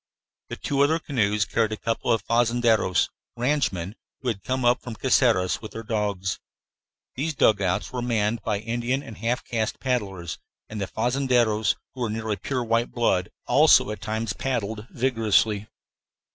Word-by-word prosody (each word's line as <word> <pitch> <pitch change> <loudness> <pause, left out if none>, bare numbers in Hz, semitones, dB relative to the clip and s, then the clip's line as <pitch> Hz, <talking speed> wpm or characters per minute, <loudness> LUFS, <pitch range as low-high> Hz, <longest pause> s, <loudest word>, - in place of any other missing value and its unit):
The - - -6 0.2
other 150 +3 +4
canoes 105 -9 0
carried 110 +1 0
a - - -4
couple 115 +1 -1
of 115 - +1
fazendeiros, 115 -5 +2 0.3
ranchmen, 120 - 0 0.3
who 125 - -1
had 100 -4 -3
come 130 -1 -1
up 120 +1 +4
from 120 -3 -7
Caceres 115 -7 +2
with 110 - -9
their 115 - -6
dogs. 105 -3 -2 0.8
These 150 +4 -2
dugouts 100 -3 +2
were 125 - -2
manned 115 -2 0
by 105 -2 -1
Indian 120 +4 -1
and 110 - -10
half 120 +2 -1
caste 110 -2 -2
paddlers, 100 -10 -2 0.3
and 110 -1 -6
the 100 - -1
fazendeiros, 120 -3 +1 0.2
who 130 - -8
were 120 - +1
of 105 - -3
nearly 110 -1 -2
pure 125 +6 -2
white 115 +1 +1
blood, 95 -7 +1 0.2
also - - +5
at 105 -3 -7
times 110 0 -2
paddled 110 -4 -3
vigorously. 110 -4 +1
115 Hz, 160 wpm, -25 LUFS, 105-125 Hz, 0.8 s, also